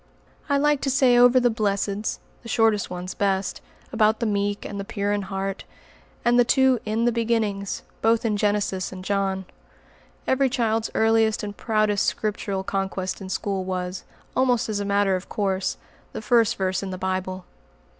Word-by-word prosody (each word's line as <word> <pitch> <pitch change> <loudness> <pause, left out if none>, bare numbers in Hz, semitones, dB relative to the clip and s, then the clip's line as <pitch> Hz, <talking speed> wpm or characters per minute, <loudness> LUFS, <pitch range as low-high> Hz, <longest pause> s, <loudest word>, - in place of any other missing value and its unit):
I 280 - +3
liked 295 0 +2
to - - +1
say 255 -2 +4
over 245 +1 +6
the 245 -1 +3
"Blesseds," 205 -1 -1 0.2
the 230 - -10
shortest 220 -3 +2
ones 180 +1 -5
best, 195 -1 -1 0.3
about 220 -1 +3
the 235 - -1
meek 205 -1 -1
and 200 - -5
the - - -3
pure 200 0 -2
in 205 - 0
heart; 195 0 -4 0.6
and 240 +1 +4
the - - +7
two 260 0 +3
"In 220 +2 0
the 240 - +3
beginnings," 220 -4 -1 0.2
both 225 +1 +2
in 215 -2 +1
Genesis 205 -2 0
and 185 -1 -9
John. 195 -1 -1 0.8
Every 265 0 +2
child's 225 -2 0
earliest 220 -1 +3
and 205 0 -5
proudest 215 -2 +1
Scriptural 200 -2 -2
conquest 190 0 -3
in 190 - -7
school 195 0 -2
was, 185 0 -4 0.3
almost 250 -3 +2
as 210 -1 -1
a 200 - -2
matter 200 -1 +2
of 185 - -6
course, 195 -2 -1 0.4
the - - -5
first 230 0 +3
verse 190 -2 -1
in 195 - -5
the 185 - -5
Bible. 185 0 -3
205 Hz, 175 wpm, -24 LUFS, 195-230 Hz, 0.8 s, the